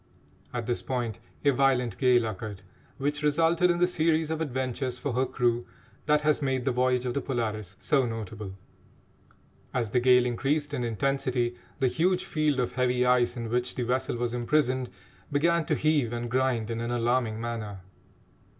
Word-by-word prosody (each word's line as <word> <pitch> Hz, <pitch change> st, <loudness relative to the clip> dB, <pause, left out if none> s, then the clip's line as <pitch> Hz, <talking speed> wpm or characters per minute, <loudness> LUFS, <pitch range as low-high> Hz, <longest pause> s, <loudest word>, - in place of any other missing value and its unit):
At 120 Hz, -2 st, -3 dB
this 120 Hz, 0 st, -1 dB
point 120 Hz, -5 st, -3 dB, 0.3 s
a 140 Hz, -, +6 dB
violent 125 Hz, -5 st, +1 dB
gale 125 Hz, -2 st, +4 dB
occurred, 105 Hz, -2 st, -6 dB, 0.3 s
which 145 Hz, +2 st, -1 dB
resulted 165 Hz, +4 st, +3 dB
in 175 Hz, -, +2 dB
the 175 Hz, -, +4 dB
series 160 Hz, -2 st, +1 dB
of 160 Hz, 0 st, -2 dB
adventures 130 Hz, -3 st, -2 dB
for 140 Hz, 0 st, -3 dB
her 130 Hz, +2 st, +1 dB
crew 120 Hz, -1 st, 0 dB, 0.4 s
that 150 Hz, 0 st, +4 dB
has 150 Hz, 0 st, +2 dB
made 130 Hz, -3 st, 0 dB
the 135 Hz, -, +2 dB
voyage 125 Hz, 0 st, +1 dB
of 125 Hz, -, -1 dB
the 140 Hz, -, -1 dB
Polaris 110 Hz, -6 st, -3 dB
so 135 Hz, -4 st, +2 dB
notable. 110 Hz, -3 st, -6 dB, 1.2 s
As 115 Hz, -4 st, -1 dB
the 125 Hz, -, +3 dB
gale 125 Hz, 0 st, +5 dB
increased 145 Hz, +5 st, -1 dB
in 125 Hz, -4 st, -1 dB
intensity, 120 Hz, +1 st, 0 dB, 0.2 s
the 130 Hz, -, +2 dB
huge 180 Hz, +7 st, +1 dB
field 150 Hz, -3 st, 0 dB
of 125 Hz, -1 st, 0 dB
heavy 125 Hz, 0 st, +1 dB
ice 125 Hz, 0 st, +3 dB
in 115 Hz, -1 st, -4 dB
which 125 Hz, +1 st, 0 dB
the 125 Hz, -, -1 dB
vessel 125 Hz, +1 st, -1 dB
was 120 Hz, 0 st, -2 dB
imprisoned 130 Hz, 0 st, +1 dB, 0.4 s
began 165 Hz, +3 st, +2 dB
to -, -, +2 dB
heave 150 Hz, -7 st, +1 dB
and 120 Hz, 0 st, -4 dB
grind 125 Hz, -3 st, +1 dB
in 115 Hz, 0 st, -3 dB
an 115 Hz, -, -2 dB
alarming 120 Hz, -2 st, 0 dB
manner. 110 Hz, -4 st, -5 dB
125 Hz, 175 wpm, -28 LUFS, 120-140 Hz, 1.2 s, a